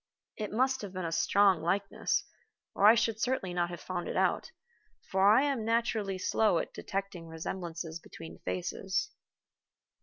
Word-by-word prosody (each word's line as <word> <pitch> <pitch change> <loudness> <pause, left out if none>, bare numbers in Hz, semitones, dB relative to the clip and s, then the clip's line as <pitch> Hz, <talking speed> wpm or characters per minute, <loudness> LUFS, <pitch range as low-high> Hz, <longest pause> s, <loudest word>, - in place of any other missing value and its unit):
It 215 -2 -4
must 260 +4 +1
have 200 -3 -7
been 185 -2 -3
a 165 - -2
strong 195 +1 +4
likeness, 190 +5 0 0.5
or 200 - +5
I 220 - +9
should 225 -1 0
certainly 245 -8 -1
not 175 -1 0
have 175 - -7
found 180 -1 -4
it - - -4
out, - - +1 0.6
for 190 +1 +5
I 225 +6 +6
am 275 -6 0
naturally 225 -4 0
slow 195 0 +2
at - - -3
detecting 195 -4 -5
resemblances 165 0 -5
between 80 - -11
faces. 185 - -2
195 Hz, 155 wpm, -31 LUFS, 175-220 Hz, 0.6 s, I